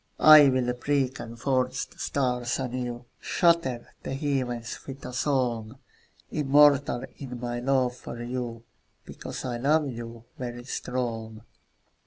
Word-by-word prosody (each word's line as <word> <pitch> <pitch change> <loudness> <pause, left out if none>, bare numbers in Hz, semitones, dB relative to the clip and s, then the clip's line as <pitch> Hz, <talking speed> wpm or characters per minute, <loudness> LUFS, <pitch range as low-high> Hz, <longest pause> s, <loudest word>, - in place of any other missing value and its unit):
I'll 135 -5 +7
break 135 +1 0
and 115 0 -8
forge 130 -1 0
the - - -21
stars 125 -3 0
anew, 125 -2 -4
Shatter 165 -9 +1
the 135 - -4
heavens 130 -5 -2
with 135 0 -8
a 125 - -6
song; 125 -3 -1 0.5
Immortal 145 -2 +4
in 125 -3 -7
my 120 0 -3
love 125 -1 +1
for 120 -1 -7
you, 120 -2 -4 0.4
Because - - -7
I 120 -2 -2
love 150 +4 +2
you, 115 -1 -8 0.2
very 120 -1 -5
strong. 115 -4 -4
125 Hz, 125 wpm, -27 LUFS, 120-135 Hz, 0.5 s, I'll